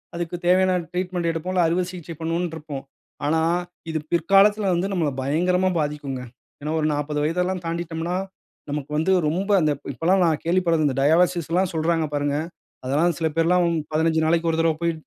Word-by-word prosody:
அதுக்கு 175 Hz, 0 st, -3 dB
தேவையான 185 Hz, +1 st, +4 dB, 0.2 s
ட்ரீட்மென்ட் 180 Hz, -1 st, -2 dB
எடுப்போம் 165 Hz, +3 st, -4 dB
இல்ல, 180 Hz, -, +3 dB
அறுவை 175 Hz, +3 st, +1 dB
சிகிச்சை 175 Hz, -2 st, -8 dB
பண்ணுவோன்று 165 Hz, +1 st, -2 dB
இருப்போம். 145 Hz, -3 st, -7 dB, 0.4 s
ஆனா, 160 Hz, +2 st, +2 dB, 0.5 s
இது 160 Hz, -, -1 dB
பிற்காலத்துல 195 Hz, +4 st, +4 dB
வந்து 175 Hz, +3 st, 0 dB
நம்மள 170 Hz, -6 st, +1 dB
பயங்கரமா 180 Hz, +7 st, +1 dB
பாதிக்குங்க. 145 Hz, -3 st, -3 dB, 0.4 s
ஏனா, 150 Hz, +1 st, -3 dB
ஒரு 155 Hz, -, +1 dB
40 150 Hz, 0 st, -2 dB
வயது 165 Hz, +4 st, 0 dB
எல்லாம் 185 Hz, -1 st, -3 dB
தாண்டிட்டோம்னா, 165 Hz, +1 st, -3 dB, 0.5 s
நமக்கு 145 Hz, 0 st, -4 dB
வந்து 170 Hz, +5 st, +1 dB, 0.2 s
ரொம்ப 185 Hz, +7 st, -1 dB
அந்த, 155 Hz, -1 st, +2 dB, 0.2 s
இப்போ 130 Hz, -, -12 dB
எல்லாம் 185 Hz, +2 st, +4 dB
நான் 160 Hz, -3 st, +1 dB
கேள்விப்பட்டது 170 Hz, -3 st, +2 dB
இந்த 130 Hz, -, -1 dB
டயாலிசிஸ் 170 Hz, +3 st, +3 dB
எல்லாம் 185 Hz, +1 st, +2 dB
சொல்றாங்க 160 Hz, 0 st, +1 dB
பாருங்க. 145 Hz, 0 st, 0 dB, 0.5 s
அதெல்லாம் 150 Hz, +6 st, +1 dB
சில 160 Hz, -, 0 dB
பேர்லாம் 175 Hz, +2 st, +3 dB, 0.3 s
15 160 Hz, +1 st, +2 dB
நாளைக்கு 165 Hz, +1 st, +2 dB
ஒரு 160 Hz, -, -1 dB
தடவ 165 Hz, -1 st, +2 dB
போய். 170 Hz, 0 st, +2 dB
165 Hz, 170 wpm, -23 LUFS, 155-180 Hz, 0.5 s, தேவையான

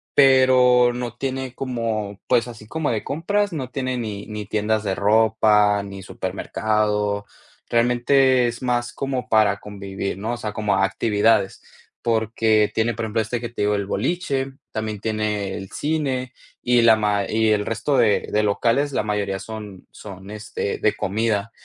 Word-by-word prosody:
Pero 130 Hz, -2 st, +5 dB
no 120 Hz, -1 st, -5 dB
tiene 130 Hz, 0 st, -4 dB
como, 110 Hz, -6 st, -3 dB
pues 120 Hz, -1 st, +2 dB
así 110 Hz, -2 st, -11 dB
como 160 Hz, +1 st, -2 dB
de 110 Hz, -, -3 dB
compras, 200 Hz, +7 st, -1 dB
no 130 Hz, -5 st, -4 dB
tiene 130 Hz, -1 st, -3 dB
ni 105 Hz, -4 st, -5 dB
ni 105 Hz, -1 st, -6 dB
tiendas 110 Hz, +1 st, 0 dB
de 95 Hz, -2 st, -1 dB
ropa 105 Hz, -1 st, +3 dB
ni 100 Hz, -1 st, -8 dB
supermercado. 105 Hz, +2 st, -1 dB, 0.4 s
Realmente 125 Hz, +2 st, +3 dB
es 120 Hz, +1 st, -5 dB
más 120 Hz, -1 st, 0 dB
como 135 Hz, -2 st, -4 dB
para 105 Hz, -2 st, +3 dB
convivir, 100 Hz, -1 st, -5 dB
¿no?, 110 Hz, +4 st, -3 dB
o -, -, -4 dB
sea, 105 Hz, -3 st, -5 dB
como 105 Hz, -2 st, 0 dB
actividades, 105 Hz, +1 st, +1 dB, 0.4 s
porque 110 Hz, -2 st, +2 dB
tiene, 110 Hz, 0 st, 0 dB
por 115 Hz, -1 st, -3 dB
ejemplo, 110 Hz, +1 st, 0 dB
este 115 Hz, +2 st, -3 dB
que 120 Hz, -1 st, -5 dB
te 120 Hz, -, -6 dB
digo, 105 Hz, 0 st, +2 dB
el 100 Hz, -1 st, -2 dB
boliche, 135 Hz, -, -2 dB, 0.2 s
también 110 Hz, -2 st, -4 dB
tiene 105 Hz, -3 st, -2 dB
el 95 Hz, -, -7 dB
cine 135 Hz, -5 st, -2 dB, 0.3 s
y 120 Hz, -1 st, +4 dB
la 115 Hz, -1 st, +7 dB
ma 105 Hz, -2 st, 0 dB
y 110 Hz, 0 st, +2 dB
el 105 Hz, -1 st, +1 dB
resto 115 Hz, +5 st, -1 dB
de 115 Hz, -4 st, +3 dB
de 105 Hz, -, +2 dB
locales, 120 Hz, +7 st, +1 dB
la -, -, 0 dB
mayoría 105 Hz, -2 st, -1 dB
son 105 Hz, -3 st, -9 dB
son, 95 Hz, 0 st, -10 dB
este, 105 Hz, -1 st, -4 dB
de 110 Hz, -, +2 dB
comida. 110 Hz, +1 st, -1 dB
110 Hz, 165 wpm, -22 LUFS, 105-125 Hz, 0.4 s, la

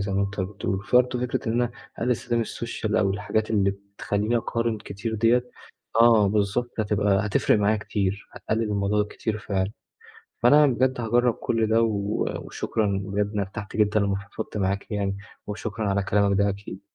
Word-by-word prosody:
زي 100 Hz, 0 st, -2 dB
ما 100 Hz, -, +2 dB
أنت 100 Hz, 0 st, -3 dB
بتقول. 95 Hz, 0 st, -3 dB
برضه 125 Hz, +1 st, +3 dB
فكرة 125 Hz, -2 st, -2 dB
إن -, -, +1 dB
أنا 120 Hz, 0 st, +1 dB, 0.3 s
أقلِّل 125 Hz, -, 0 dB
استخدام 120 Hz, 0 st, 0 dB
السوشيال 115 Hz, -1 st, -3 dB
أو 100 Hz, -2 st, +3 dB
الحاجات 110 Hz, +2 st, -1 dB
اللي 100 Hz, -3 st, +3 dB
بتخلّيني 100 Hz, +3 st, -2 dB
أقارن 115 Hz, -1 st, -1 dB
كتير 105 Hz, +2 st, -5 dB
ديّة 120 Hz, +3 st, +2 dB, 0.5 s
آه 115 Hz, -3 st, +6 dB
بالضبط، 105 Hz, +4 st, 0 dB
هتبقى 105 Hz, -1 st, +1 dB
هتفرق 105 Hz, +1 st, +2 dB
معايا 105 Hz, +1 st, +3 dB
كتير، 100 Hz, -2 st, -2 dB
هتقلِّل 110 Hz, +1 st, -2 dB
الموضوع 105 Hz, 0 st, +1 dB
كتير 110 Hz, -1 st, -3 dB
فعلًا. 100 Hz, -1 st, -2 dB, 0.7 s
فأنا 145 Hz, +5 st, +7 dB
بجد 130 Hz, 0 st, +1 dB
هاجرّب 120 Hz, +1 st, +2 dB
كل 115 Hz, -1 st, 0 dB
ده 110 Hz, +1 st, +3 dB
و 105 Hz, -2 st, 0 dB, 0.2 s
وشكرًا 100 Hz, -3 st, -1 dB
بجد 100 Hz, +1 st, -1 dB
أنا 105 Hz, -1 st, 0 dB
ارتحت 100 Hz, +2 st, -7 dB
جدًا 105 Hz, 0 st, +3 dB
لمّا 100 Hz, -1 st, +1 dB
فضفضت 100 Hz, +3 st, -7 dB
معاك 100 Hz, 0 st, -1 dB
يعني، 100 Hz, -2 st, -1 dB, 0.3 s
وشكرًا 105 Hz, +1 st, -3 dB
على 100 Hz, 0 st, +1 dB
كلامك 100 Hz, 0 st, +2 dB
ده 100 Hz, 0 st, +3 dB
أكيد. 100 Hz, -1 st, -6 dB
105 Hz, 170 wpm, -25 LUFS, 100-115 Hz, 0.7 s, فأنا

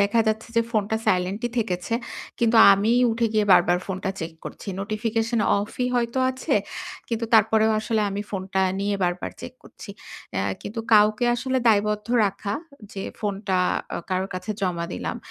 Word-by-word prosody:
দেখা 200 Hz, +3 st, +3 dB
যাচ্ছে 220 Hz, +2 st, -2 dB
যে, 230 Hz, -, +5 dB
ফোনটা 215 Hz, -1 st, 0 dB
silent 185 Hz, +3 st, +1 dB
ই -, -, -3 dB
থেকেছে। 185 Hz, -1 st, -2 dB, 0.4 s
কিন্তু 230 Hz, 0 st, +3 dB, 0.2 s
আমি 205 Hz, +4 st, +2 dB, 0.2 s
উঠে 230 Hz, +1 st, +1 dB
গিয়ে 215 Hz, -1 st, +2 dB
বারবার 175 Hz, 0 st, +5 dB
ফোনটা 190 Hz, 0 st, -3 dB
check 160 Hz, 0 st, -5 dB
করছি। -, -, -8 dB
notification 225 Hz, +2 st, -1 dB, 0.2 s
off 205 Hz, +2 st, -3 dB
ই 250 Hz, -, +1 dB
হয়তো 235 Hz, +1 st, 0 dB
আছে, 260 Hz, 0 st, -2 dB, 0.5 s
কিন্তু 230 Hz, -1 st, -2 dB
তারপরেও 220 Hz, 0 st, +4 dB
আসলে 220 Hz, 0 st, 0 dB
আমি 200 Hz, +1 st, -3 dB
ফোনটা 190 Hz, -1 st, -2 dB, 0.2 s
নিয়ে 200 Hz, 0 st, 0 dB
বারবার 175 Hz, 0 st, -2 dB
চেক -, -, -8 dB
করছি। -, -, -12 dB, 0.5 s
আ -, -, +1 dB, 0.2 s
কিন্তু 225 Hz, +3 st, -5 dB
কাউকে 210 Hz, +2 st, +4 dB
আসলে 260 Hz, +2 st, -1 dB
দায়বদ্ধ 210 Hz, -1 st, +2 dB, 0.2 s
রাখা 200 Hz, +1 st, -4 dB, 0.4 s
যে, 195 Hz, -, -5 dB, 0.2 s
ফোনটা 200 Hz, -2 st, -2 dB, 0.4 s
আ -, -, -2 dB
কারোর 185 Hz, +1 st, -1 dB
কাছে 185 Hz, +4 st, -5 dB
জমা 180 Hz, -3 st, -1 dB
দিলাম, -, -, -4 dB
210 Hz, 165 wpm, -24 LUFS, 195-225 Hz, 0.5 s, যে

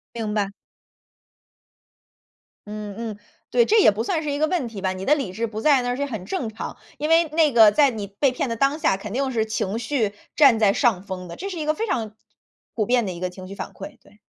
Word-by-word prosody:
明 215 Hz, -2 st, -3 dB
白。 205 Hz, -2 st, 0 dB, 2.2 s
嗯 210 Hz, -1 st, -6 dB
嗯， 225 Hz, -3 st, -5 dB, 0.3 s
对， 475 Hz, -1 st, +4 dB
这 440 Hz, 0 st, +4 dB
也 -, -, +7 dB
不 215 Hz, +3 st, -3 dB
算 320 Hz, +3 st, -1 dB
是 295 Hz, -2 st, -3 dB
一 285 Hz, -, -2 dB
个 310 Hz, +1 st, +2 dB
问 320 Hz, -8 st, -1 dB
题 210 Hz, -4 st, -8 dB
吧， 190 Hz, -1 st, 0 dB
你 185 Hz, +1 st, -6 dB
的 295 Hz, -, +5 dB
理 245 Hz, -11 st, -3 dB
智 230 Hz, +4 st, -2 dB
不 215 Hz, 0 st, -6 dB
在 275 Hz, -1 st, +4 dB
那 245 Hz, 0 st, -1 dB
是 280 Hz, -, -5 dB
也 -, -, +1 dB
很 215 Hz, -8 st, -6 dB
正 315 Hz, -13 st, -3 dB
常。 220 Hz, -, -7 dB, 0.2 s
因 300 Hz, +2 st, -2 dB
为 330 Hz, +1 st, +5 dB
那 310 Hz, -1 st, +3 dB
个 220 Hz, -3 st, +7 dB
在 285 Hz, +4 st, +4 dB
你 220 Hz, -5 st, -5 dB
被 250 Hz, +7 st, +1 dB
骗 255 Hz, 0 st, -2 dB
的 230 Hz, -, -2 dB
当 275 Hz, +5 st, +1 dB
下， 195 Hz, -11 st, +1 dB
肯 205 Hz, +1 st, -7 dB
定 265 Hz, 0 st, -1 dB
是 220 Hz, -2 st, 0 dB
情 215 Hz, 0 st, -2 dB
绪 225 Hz, -4 st, -1 dB, 0.2 s
占 270 Hz, -7 st, +6 dB
在 200 Hz, -2 st, +4 dB
上 215 Hz, -8 st, +2 dB
风 185 Hz, -2 st, -6 dB
的。 170 Hz, -, -8 dB
这 395 Hz, +2 st, -5 dB
是 360 Hz, -, -6 dB
一 300 Hz, -, -3 dB
个 310 Hz, -, +2 dB
非 445 Hz, +6 st, -3 dB
常 220 Hz, -, -2 dB, 0.6 s
普 215 Hz, -3 st, 0 dB
遍 245 Hz, 0 st, +2 dB
的 190 Hz, -, -3 dB
一 170 Hz, -, -8 dB
个 185 Hz, 0 st, -2 dB
情 185 Hz, 0 st, -11 dB
绪 195 Hz, -, -8 dB
反 -, -, -6 dB
馈， 195 Hz, -, -10 dB
对。 210 Hz, -, -22 dB
230 Hz, 270 characters per minute, -23 LUFS, 205-285 Hz, 2.2 s, 也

